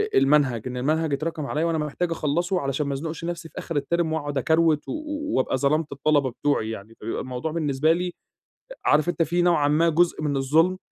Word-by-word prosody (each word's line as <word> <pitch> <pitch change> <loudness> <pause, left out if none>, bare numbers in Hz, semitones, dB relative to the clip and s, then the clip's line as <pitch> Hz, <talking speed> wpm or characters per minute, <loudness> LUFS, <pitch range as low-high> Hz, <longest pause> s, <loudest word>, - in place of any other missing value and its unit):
المنهج، 135 -5 +3
إن 125 0 -5
المنهج 155 +4 0
اتراكم 155 +1 -2
عليَّ 150 +3 -1
وأنا 165 -1 +1
محتاج 155 +3 -2
أخلَّصه 170 +4 0
علشان 140 +1 -1
ما 140 - -1
ازنقش 160 +4 -5
نفسي 170 -1 -5
في - - -19
آخر 165 -4 -2
الterm 170 +5 -1
وأقعد 145 -3 -2
أكروِت 160 +2 +2
و - - -4 0.5
وابقى 130 0 +1
ظلَمت 150 +3 +1
الطلبة 140 -1 +1
بتوعي 135 -4 0
يعني، 110 0 -8
فبيبقى 115 +1 -4
الموضوع 130 +4 -4
بالنسبة 155 -1 +1
لي 180 +1 -2 0.7
عارف 150 +3 +3
أنت 175 -1 +1
في 175 +2 +1
نوعًا 170 -5 +3
ما 160 +3 +3
جزء 165 0 +2
من 145 -2 0
الظلم، 160 +7 +2
150 Hz, 190 wpm, -24 LUFS, 140-165 Hz, 0.7 s, المنهج